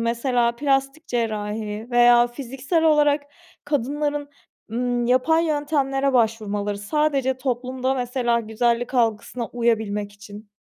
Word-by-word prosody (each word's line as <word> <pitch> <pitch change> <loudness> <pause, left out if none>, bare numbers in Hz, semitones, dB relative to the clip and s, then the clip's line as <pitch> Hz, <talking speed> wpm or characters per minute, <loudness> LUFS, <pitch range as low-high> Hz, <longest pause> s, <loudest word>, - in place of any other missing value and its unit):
Mesela 235 0 0
plastik 275 +2 0
cerrahi 215 -1 -3
veya 240 0 +6
fiziksel 270 +6 -2
olarak 295 -2 +4 0.4
kadınların, 290 +1 -1 0.4
ımm, 245 0 -1
yapay 320 +7 +3
yöntemlere 280 -3 0
başvurmaları, 210 -3 0
sadece 270 +2 0
toplumda 255 +1 -2
mesela 245 -2 0
güzellik 235 +3 -1
algısına 230 0 0
uyabilmek 220 -4 -1
için. 205 +1 -12
245 Hz, 100 wpm, -23 LUFS, 230-275 Hz, 0.4 s, veya